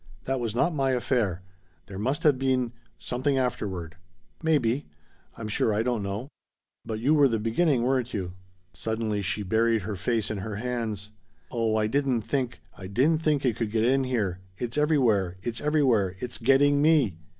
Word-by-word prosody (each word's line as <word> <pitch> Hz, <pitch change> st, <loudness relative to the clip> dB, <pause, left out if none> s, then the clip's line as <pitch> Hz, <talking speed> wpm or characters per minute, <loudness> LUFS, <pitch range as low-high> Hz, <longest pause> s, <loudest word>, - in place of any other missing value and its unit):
"That 135 Hz, 0 st, -1 dB
was 115 Hz, -2 st, -3 dB
not 170 Hz, +8 st, +2 dB
my 135 Hz, -3 st, +1 dB
affair. 120 Hz, -8 st, 0 dB, 0.4 s
There 95 Hz, -1 st, -8 dB
must 130 Hz, +7 st, -1 dB
have 145 Hz, -4 st, +4 dB
been 130 Hz, -3 st, +1 dB, 0.3 s
something 130 Hz, +3 st, -1 dB
afterward." 95 Hz, -10 st, -2 dB, 0.4 s
"Maybe. 145 Hz, -5 st, +1 dB, 0.5 s
I'm 110 Hz, -, -5 dB
sure 110 Hz, +1 st, +1 dB
I 105 Hz, +1 st, +1 dB
don't 120 Hz, -3 st, 0 dB
know. 100 Hz, +6 st, -4 dB, 0.6 s
But 110 Hz, -1 st, -4 dB
you 135 Hz, +7 st, +3 dB
were 145 Hz, -2 st, +6 dB
the 115 Hz, -3 st, 0 dB
beginning, 120 Hz, +4 st, +1 dB
weren't 125 Hz, -1 st, 0 dB
you?" 90 Hz, -3 st, -4 dB, 0.4 s
Suddenly 110 Hz, -2 st, -2 dB
she 100 Hz, +2 st, -1 dB
buried 110 Hz, +2 st, +2 dB
her 105 Hz, +1 st, -4 dB
face 110 Hz, +3 st, -1 dB
in 105 Hz, -, -3 dB
her 105 Hz, +2 st, -5 dB
hands. 110 Hz, -3 st, -3 dB, 0.4 s
"Oh 115 Hz, -3 st, 0 dB
I 110 Hz, -1 st, +2 dB
didn't 130 Hz, 0 st, +1 dB
think 130 Hz, -2 st, -2 dB
I 95 Hz, -, -8 dB
didn't 145 Hz, +11 st, +2 dB
think 150 Hz, -3 st, +1 dB
it 120 Hz, -4 st, +1 dB
could 115 Hz, -3 st, -1 dB
get 110 Hz, +1 st, +1 dB
in 135 Hz, +2 st, +3 dB
here! 105 Hz, -8 st, -1 dB, 0.2 s
It's 120 Hz, +1 st, -3 dB
everywhere! 120 Hz, -, +2 dB
It's 115 Hz, -1 st, -3 dB
everywhere! 130 Hz, -11 st, +2 dB
It's 120 Hz, +1 st, -3 dB
getting 140 Hz, +4 st, +4 dB
me!" 145 Hz, -, +3 dB
120 Hz, 175 wpm, -27 LUFS, 105-135 Hz, 0.6 s, were